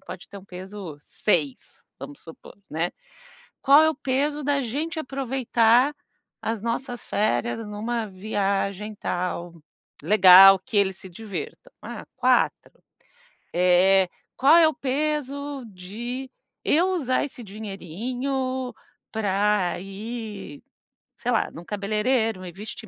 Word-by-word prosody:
pode 180 Hz, -, -10 dB
ter -, -, -11 dB
um 190 Hz, -, -15 dB
peso 190 Hz, -3 st, -8 dB
6, 150 Hz, -4 st, -2 dB
vamos 145 Hz, -, -9 dB
supor, 165 Hz, -, -13 dB
né. 165 Hz, +3 st, -1 dB, 0.7 s
Qual 285 Hz, +2 st, +7 dB
é 315 Hz, -, +4 dB
o 315 Hz, -, -3 dB
peso 290 Hz, +2 st, -1 dB
da 280 Hz, 0 st, +1 dB
gente 295 Hz, +7 st, -3 dB
aproveitar 255 Hz, -2 st, +2 dB, 0.5 s
as 225 Hz, -2 st, -3 dB
nossas 245 Hz, +1 st, -3 dB
férias 220 Hz, +2 st, 0 dB
numa 220 Hz, +2 st, -3 dB
viagem 200 Hz, +1 st, -2 dB
tal, 175 Hz, -2 st, -3 dB, 0.5 s
legal, 195 Hz, -1 st, +9 dB
que 220 Hz, +5 st, -9 dB
eles 195 Hz, -2 st, +3 dB
se 190 Hz, -, -10 dB
divirtam? 185 Hz, -3 st, -7 dB
Ah, -, -, -8 dB
4. -, -, +1 dB, 0.7 s
Eh, 180 Hz, +2 st, +4 dB, 0.3 s
qual 280 Hz, +5 st, +6 dB
é 330 Hz, -2 st, +7 dB
o 315 Hz, -, -2 dB
peso 285 Hz, 0 st, -2 dB
de 230 Hz, +7 st, -7 dB, 0.3 s
eu 350 Hz, +5 st, +3 dB
usar 265 Hz, -8 st, 0 dB
esse 285 Hz, -3 st, -7 dB
dinheirinho 245 Hz, -, -4 dB, 0.4 s
pra 200 Hz, -4 st, +1 dB
ir, 205 Hz, -4 st, -7 dB, 0.6 s
sei 245 Hz, -, -2 dB
lá, 230 Hz, -, +1 dB
no 170 Hz, -, -10 dB
cabeleireiro, 215 Hz, +1 st, 0 dB
me 180 Hz, -1 st, -7 dB
vestir 210 Hz, +4 st, -8 dB
220 Hz, 120 wpm, -24 LUFS, 190-260 Hz, 0.7 s, legal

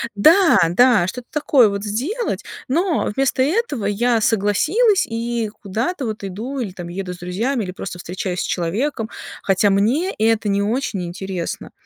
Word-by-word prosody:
Да, 315 Hz, -, +6 dB
да, 235 Hz, -1 st, +4 dB
что-то 245 Hz, +5 st, -6 dB
такое 280 Hz, -6 st, +4 dB
вот 200 Hz, 0 st, -4 dB
сделать, 285 Hz, -, -2 dB, 0.3 s
но 340 Hz, +4 st, +1 dB
вместо 270 Hz, -1 st, +1 dB
этого 300 Hz, -, 0 dB
я 225 Hz, +3 st, +1 dB
согласилась 305 Hz, -, +2 dB
и 230 Hz, -1 st, -2 dB
куда-то 235 Hz, -, -2 dB
вот 215 Hz, -2 st, -5 dB
иду, 225 Hz, +9 st, -5 dB
или 210 Hz, -6 st, -3 dB
там 175 Hz, -2 st, -7 dB
еду 180 Hz, 0 st, -5 dB
с -, -, -10 dB
друзьями, 220 Hz, +8 st, -1 dB
или 185 Hz, -, -5 dB
просто 180 Hz, -2 st, -7 dB
встречаюсь 180 Hz, +1 st, -4 dB
с -, -, -1 dB
человеком, 220 Hz, -, -2 dB, 0.3 s
хотя 195 Hz, +1 st, +3 dB
мне 240 Hz, -, +1 dB
это 220 Hz, 0 st, +2 dB
не 200 Hz, 0 st, +1 dB
очень 215 Hz, -4 st, -1 dB
интересно. 185 Hz, 0 st, -5 dB
225 Hz, 155 wpm, -20 LUFS, 195-270 Hz, 0.3 s, Да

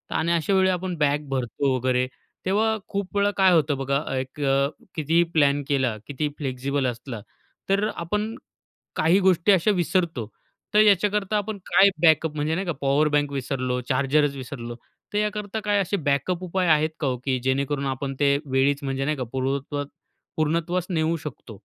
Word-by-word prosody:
आणि 170 Hz, +1 st, +1 dB
अशा 170 Hz, +3 st, +1 dB
वेळी 190 Hz, 0 st, +4 dB
आपण 180 Hz, 0 st, -2 dB
बॅग 150 Hz, 0 st, +1 dB
भरतो 130 Hz, +1 st, -1 dB
वगैरे. 130 Hz, 0 st, +1 dB, 0.4 s
तेव्हा 220 Hz, +4 st, +2 dB
खूप 200 Hz, 0 st, -4 dB
वेळा 200 Hz, 0 st, +3 dB
काय 190 Hz, -1 st, +5 dB
होतं 150 Hz, -4 st, +2 dB
बघा 140 Hz, +1 st, 0 dB, 0.2 s
एक 130 Hz, +2 st, -5 dB
अ, 140 Hz, 0 st, +2 dB, 0.3 s
कितीही 165 Hz, +2 st, +2 dB
प्लॅन 145 Hz, -2 st, +3 dB
केला, 130 Hz, -5 st, +1 dB
किती 145 Hz, +1 st, -2 dB
फ्लेक्सिबल 135 Hz, 0 st, -2 dB
असला 120 Hz, -1 st, -5 dB, 0.5 s
तर 200 Hz, +2 st, +2 dB
आपण 210 Hz, +6 st, -2 dB, 0.6 s
काही 170 Hz, +5 st, +4 dB
गोष्टी 185 Hz, 0 st, +3 dB
अशा 190 Hz, +2 st, +4 dB
विसरतो 170 Hz, -, 0 dB, 0.5 s
तर 210 Hz, -, +5 dB
ह्याच्याकरता 205 Hz, +1 st, +2 dB
आपण 210 Hz, +1 st, -3 dB
काय 200 Hz, -, +6 dB
बॅकअप 160 Hz, -1 st, +4 dB
म्हणजे 150 Hz, +2 st, 0 dB
नाही 190 Hz, +2 st, -2 dB
का -, -, +1 dB
पॉवर 140 Hz, +2 st, +3 dB
बँक 145 Hz, -1 st, +1 dB
विसरलो, 130 Hz, -2 st, -2 dB
चार्जरच 140 Hz, +2 st, +2 dB
विसरलो, 120 Hz, -3 st, -7 dB, 0.4 s
तर -, -, 0 dB
याकरता 210 Hz, 0 st, -2 dB
काय 205 Hz, -1 st, +2 dB
असे 200 Hz, +2 st, -1 dB
बॅकअप 145 Hz, +4 st, -1 dB
उपाय 185 Hz, 0 st, -1 dB
आहेत 155 Hz, -1 st, +4 dB
का 150 Hz, -, -1 dB
ओ 130 Hz, -1 st, 0 dB
की 130 Hz, -2 st, +1 dB
जेणेकरून 140 Hz, +2 st, 0 dB
आपण 135 Hz, +1 st, -3 dB
ते 140 Hz, -1 st, +4 dB
वेळीच 140 Hz, +1 st, +2 dB
म्हणजे 135 Hz, 0 st, -2 dB
नाही 150 Hz, +1 st, -1 dB
का 130 Hz, -, -2 dB
पूर्वत्वास 140 Hz, +2 st, -2 dB, 0.5 s
पूर्णत्वास 165 Hz, +3 st, 0 dB
नेऊ 165 Hz, -2 st, +1 dB
शकतो? 130 Hz, -8 st, -9 dB
150 Hz, 170 wpm, -24 LUFS, 135-185 Hz, 0.6 s, काय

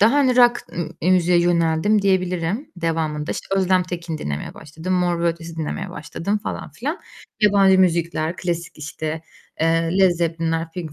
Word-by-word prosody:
daha, 220 Hz, +5 st, +6 dB
hani, 260 Hz, -4 st, +3 dB
rock 240 Hz, -1 st, +5 dB, 0.4 s
m 180 Hz, -, +2 dB
müziğe 180 Hz, -1 st, +4 dB
yöneldim 170 Hz, +4 st, +2 dB
diyebilirim 185 Hz, -, 0 dB
devamında. 160 Hz, -2 st, -2 dB
İşte, -, -, -3 dB
Özlem 185 Hz, -1 st, +3 dB
Tekin 170 Hz, -3 st, -5 dB
dinlemeye 75 Hz, -, -4 dB
başladım, 160 Hz, +5 st, -6 dB
Mor 175 Hz, -2 st, +1 dB
ve 170 Hz, -, +1 dB
Ötesi 165 Hz, 0 st, -5 dB
dinlemeye 175 Hz, +4 st, -4 dB
başladım 165 Hz, +6 st, -3 dB
falan 205 Hz, -, -6 dB
filan. 295 Hz, +9 st, -4 dB, 0.4 s
Yabancı 195 Hz, -2 st, +5 dB
müzikler, 170 Hz, -2 st, +1 dB
klasik, 170 Hz, -3 st, -4 dB
işte, 155 Hz, +1 st, -5 dB, 0.4 s
eee, 165 Hz, 0 st, +2 dB
Led 190 Hz, -1 st, +6 dB
Zeppelinler, 165 Hz, -1 st, -1 dB
Pink 165 Hz, -4 st, -6 dB
170 Hz, 155 wpm, -21 LUFS, 165-190 Hz, 0.4 s, daha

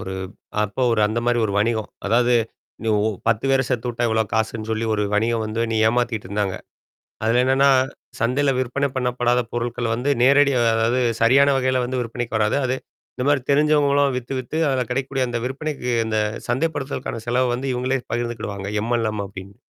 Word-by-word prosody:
ஒரு 95 Hz, 0 st, -5 dB, 0.5 s
அப்ப 105 Hz, +4 st, -5 dB
ஒரு 110 Hz, -, +1 dB
அந்த 110 Hz, +2 st, -2 dB
மாரி 120 Hz, 0 st, +2 dB
ஒரு 100 Hz, -, -1 dB
வணிகம். 110 Hz, 0 st, 0 dB, 0.2 s
அதாவது, 120 Hz, +3 st, +3 dB, 0.5 s
நீ 115 Hz, -, -2 dB
ஒ -, -, +1 dB, 0.3 s
10 115 Hz, +1 st, +1 dB
பேர 135 Hz, 0 st, +3 dB
சேத்துவுட்டா, 120 Hz, -1 st, -1 dB
இவ்வளோ 110 Hz, 0 st, +1 dB
காசுன்னு 110 Hz, 0 st, -1 dB
சொல்லி, 110 Hz, +1 st, -1 dB
ஒரு 105 Hz, -, 0 dB
வணிகம் 115 Hz, +1 st, +1 dB
வந்து 110 Hz, +2 st, -2 dB
நீ -, -, 0 dB
ஏமாத்திட்டு 120 Hz, -4 st, -1 dB
இருந்தாங்க. 100 Hz, -2 st, -1 dB, 0.7 s
அதுல 120 Hz, +3 st, +3 dB
என்னான்னா, 135 Hz, +2 st, +4 dB, 0.5 s
சந்தையில 135 Hz, +4 st, +2 dB
விற்பனை 135 Hz, +3 st, 0 dB
பண்ணப்படாத 125 Hz, -1 st, +1 dB
பொருள்கள 120 Hz, 0 st, -2 dB
வந்து 130 Hz, +5 st, -1 dB
நேரடியா 140 Hz, 0 st, +5 dB, 0.2 s
அதாவது, 115 Hz, +3 st, +1 dB, 0.2 s
சரியான 140 Hz, +4 st, +5 dB
வகையில 130 Hz, -1 st, +1 dB
வந்து 130 Hz, 0 st, -2 dB
விற்பனைக்கு 115 Hz, -1 st, -4 dB
வராது. 110 Hz, +5 st, +2 dB
அது 130 Hz, -, 0 dB, 0.4 s
இந்த 125 Hz, -, -2 dB
மாரி 145 Hz, -, +3 dB
தெரிஞ்சவங்களாம் 145 Hz, -2 st, +3 dB
வித்து, 125 Hz, +1 st, -8 dB
வித்து 130 Hz, +5 st, -6 dB
அதுல 130 Hz, -2 st, 0 dB
கெடைக்கக்கூடிய 135 Hz, +1 st, -1 dB
அந்த 120 Hz, -, -2 dB
விற்பனைக்கு 135 Hz, -1 st, -4 dB, 0.2 s
அந்த 110 Hz, -1 st, 0 dB, 0.3 s
சந்தைப்படுத்துதலுக்கான 135 Hz, -4 st, -2 dB
செலவ 125 Hz, +2 st, +2 dB
வந்து 130 Hz, +3 st, -3 dB
இவுங்களே 130 Hz, +1 st, -1 dB
பகிர்ந்துக்கிடுவாங்க 115 Hz, -4 st, -3 dB
"எம்-எல்-எம்" 110 Hz, -3 st, -1 dB
அப்டின்னு. 95 Hz, 0 st, -11 dB
120 Hz, 165 wpm, -22 LUFS, 110-130 Hz, 0.7 s, நேரடியா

